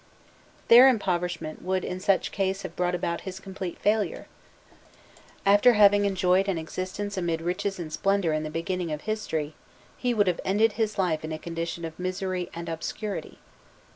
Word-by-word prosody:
Their 245 +3 +9
impoverishment 180 -8 -1
would 185 0 -1
in 180 - -4
such 190 0 +1
case 195 0 -1
have 165 - -7
brought 180 0 0
about 170 -1 -2
his 190 0 -7
complete 190 -2 -6
failure: 210 -3 0 1.2
after 205 +5 +6
having 205 -1 +5
enjoyed 190 0 +2
an 190 -3 0
existence 185 +5 -4
amid 170 -3 -1
riches 180 +4 -2
and 160 -3 -6
splendour 195 -1 +1
in 155 - 0
the 155 - -4
beginning 170 +1 -3
of 150 0 -4
history, 160 -9 -3 0.4
he 245 -1 -1
would 205 -2 +4
have 180 -2 0
ended 210 +4 +3
his 215 0 -2
life 175 -5 0
in 155 - -5
a 155 - -3
condition 165 +1 -4
of 160 +1 -8
misery 185 -1 -3
and 170 0 -6
obscurity. 170 +5 -5
185 Hz, 170 wpm, -26 LUFS, 170-200 Hz, 1.2 s, Their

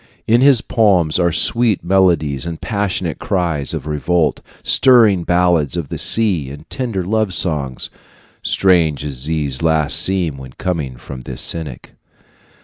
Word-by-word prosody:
In 115 +2 +3
his 135 -4 +5
poems 95 -8 +1
are 85 -1 +1
sweet 115 +3 +2
melodies 85 -6 +1
and 85 -1 -6
passionate 100 -6 -3
cries 85 -7 -1
of 80 -4 -4
revolt, 75 +2 -1 0.2
stirring 115 -9 +4
ballads 85 -3 +1
of 80 -5 -5
the - - -4
sea 95 -12 +2
and 70 +1 -11
tender 115 -8 -3
love 105 0 0
songs 70 -7 -1 0.5
strange 85 -6 +1
as 70 -3 -5
these 75 -5 -2
last 80 -2 +1
seem 90 -7 -1
when 65 -1 -11
coming 75 -9 -4
from 65 +1 -10
this 65 0 -4
cynic. 80 -7 -3
85 Hz, 140 wpm, -17 LUFS, 75-95 Hz, 0.5 s, his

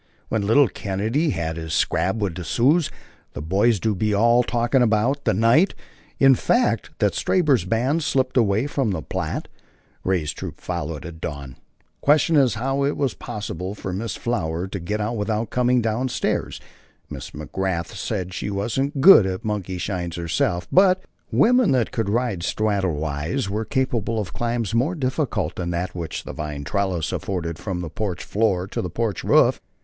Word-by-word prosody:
"when 110 - 0
little 130 +5 +5
Kennedy 110 - -1
had 80 - -2
his 80 -1 -3
scrap 95 - +1
wid 100 -5 -1
the 90 +1 -6
Sioux 140 - +3 0.5
the - - -6
boys 100 +6 +2
do 110 +2 0
be 105 +2 0
all 120 +3 +5
talkin' 120 +1 +1
about" 120 +5 +2
the - - +3
night, 115 - +4 0.4
in 135 0 +6
fact, 240 - +1
that - - +2
Stabber's 145 - +2
band 125 - +1
slipped 130 -3 0
away 110 -1 +3
from 140 -5 -1
the 85 -6 -2
Platte, - - -3 0.6
Ray's 85 -5 0
troop - - -7
following 80 -4 -4
at 80 -1 -9
dawn. 70 -4 -6 0.5
Questioned 150 +2 +4
as 130 -5 +3
to - - -6
how 135 +2 0
it 140 +1 0
was 135 -5 0
possible 105 -4 -5
for 95 -2 -5
Miss 110 +5 -3
Flower 90 -7 -2
to 100 - -4
get 105 +5 -3
out 110 +3 -2
without 110 +2 -2
coming 125 -1 +2
down 115 +4 0
stairs, - - -2 0.5
Miss - - -6
McGrath 85 +3 -3
said 95 -4 -3
she 95 - -3
wasn't 135 +8 -1
good 135 - +9
at 95 -1 -4
monkeyshines 90 -4 -3
herself, 85 +1 -1
but 185 0 +5 0.3
"wimmen 250 - +4
that 125 -3 +1
could 115 -5 -1
ride 115 -3 0
sthraddle 100 -3 0
wise" 80 - -2
were 110 +2 -2
capable 120 -4 -1
of 95 -5 -4
climbs 115 -2 -2
more 135 +10 +1
difficult 130 - -1
than 85 -2 -3
that 90 +1 -2
which 85 -3 -5
the - - -7
vine 75 -2 -5
trellis 95 -1 -1
afforded 85 -4 -3
from 95 -4 -4
the 85 - -5
porch 100 -3 -3
floor 100 -4 0
to 95 - -4
the 90 - -4
porch 110 +1 -2
roof. - - +4
105 Hz, 175 wpm, -23 LUFS, 90-125 Hz, 0.6 s, good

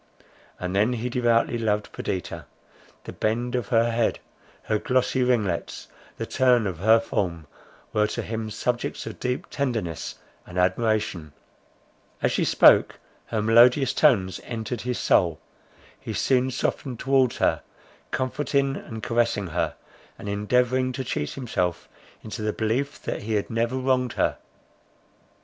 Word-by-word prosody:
And 90 +1 -3
then 105 +5 +3
he 120 +1 -3
devoutly 120 -1 +2
loved 105 -2 -1
Perdita; 95 -5 -4 0.6
the - - -8
bend 120 +3 -1
of 125 -2 -1
her 120 -1 +3
head, 115 -1 +1 0.5
her 110 - 0
glossy 130 +2 +1
ringlets, 110 -9 -1 0.3
the - - -3
turn 125 -3 +3
of 90 -4 -3
her 110 +4 +5
form 90 -8 -2 0.5
were 105 0 +3
to - - -4
him 110 -1 -4
subjects 120 +3 -2
of - - -7
deep 125 0 -2
tenderness 115 - -2 0.3
and 90 - -8
admiration; 95 -4 0 0.9
as - - +1
she - - +1
spoke, - - +5 0.3
her 110 -2 -1
melodious 120 +4 +5
tones 100 -12 +3
entered 115 0 -4
his 125 0 -2
soul; 85 -4 +2 0.6
he - - -6
soon 130 -1 +2
softened 130 0 -2
towards 135 -2 +2
her, - - +1 0.5
comforting 135 +1 0
and 110 -5 -8
caressing 115 -4 +1
her, 80 - -2 0.4
and - - -9
endeavouring 125 +5 +1
to 130 - -3
cheat 75 - -3
himself 90 -10 -2 0.4
into 110 +1 -6
the 105 0 0
belief 125 +6 -1
that - - -3
he 110 +1 -2
had 105 - -1
never 115 +2 0
wronged 130 -1 +1
her. - - 0
115 Hz, 140 wpm, -25 LUFS, 105-125 Hz, 0.9 s, her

